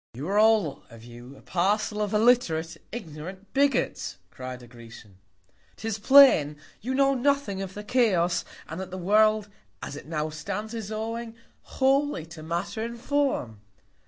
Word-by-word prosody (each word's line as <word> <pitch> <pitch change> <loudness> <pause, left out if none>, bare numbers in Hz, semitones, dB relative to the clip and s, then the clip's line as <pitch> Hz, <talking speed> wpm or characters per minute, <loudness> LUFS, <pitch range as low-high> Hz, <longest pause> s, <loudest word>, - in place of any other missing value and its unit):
_ - - -12
You 145 +5 -5
are 205 +1 +2
all 215 -9 +3
of 115 0 -14
you 120 +3 -12
a - - -18
Parcel 210 +4 0
of 205 -1 -1
illiterate, 210 -8 +2 0.2
ignorant 190 -1 -8
Bigots, 280 0 0
cry'd 130 -1 -8
a - - -13
Grecian: 115 -4 -14 0.6
'Tis 220 -1 -4
plain, 230 - +6 0.2
you 255 +4 -2
know 275 0 +4
nothing 270 -6 0
of 190 -1 -6
the 210 - -6
Chaos, 190 -7 +2 0.2
and 160 +3 -6
that 190 - -6
the 185 - -6
World, 215 +3 +3 0.3
as - - -7
it 145 - -10
now 155 -1 -2
stands, 200 +8 -5
is 220 -2 -5
owing 225 +1 -4 0.4
wholly 275 - +2
to 165 -1 -11
Matter 170 +7 -3
and 235 +1 -6
Form. 260 - -1
200 Hz, 160 wpm, -26 LUFS, 155-230 Hz, 0.6 s, plain